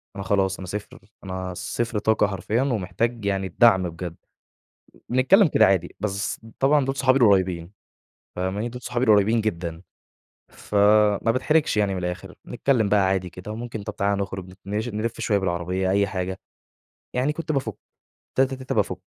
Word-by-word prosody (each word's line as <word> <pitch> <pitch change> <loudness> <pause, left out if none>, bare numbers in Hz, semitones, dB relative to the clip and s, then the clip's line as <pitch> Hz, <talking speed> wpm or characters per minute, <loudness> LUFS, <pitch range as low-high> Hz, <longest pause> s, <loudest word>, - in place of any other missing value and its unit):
أنا 100 - -5
خلاص 95 -1 +1
أنا 95 - -7
0، 105 +2 -6 0.2
أنا 95 -1 -5
0 115 +3 -3
طاقة 110 -1 +2
حرفيًا 105 +4 -1
ومحتاج 115 -2 -1
يعني 95 -1 0
الدعم 95 -2 +4
بجد. 85 0 -7 0.9
بنتكلم 135 - +5
كده - - +4
عادي، 95 -3 +1
بس 100 0 -2 0.2
طبعًا 140 0 +3
دول 135 0 -2
صحابي 135 -1 +3
القريبين، 95 -6 +3 0.7
فاهماني؟ 95 +5 -2
دول 125 +1 -9
صحابي 120 +2 -1
القريبين 110 0 +4
جدًا، 85 -5 -3 0.7
فما 105 +1 +3
باتحرجش 150 +2 +1
يعني 100 -2 +1
من 95 - -3
الآخر، 90 +1 -5
بنتكلم 120 -3 +1
بقى 100 -2 +3
عادي 95 -2 0
كده، 90 +4 -8
وممكن 115 -1 -6
طب، - - -7
تعالَ 100 0 +1
نخرج، 95 -2 -5
نـش 105 +4 -2
نلف 110 +1 -3
شوية 105 -3 +1
بالعربية، 90 0 -1
أي 100 +1 +3
حاجة. 95 0 -4 0.8
يعني 130 +4 +1
كنت 165 0 -4
بافٌك، 135 -8 -2 0.6
تاته، 135 0 +2
تاته، 130 -1 -5
بافّك. - - 0
100 Hz, 155 wpm, -24 LUFS, 95-120 Hz, 0.9 s, بنتكلم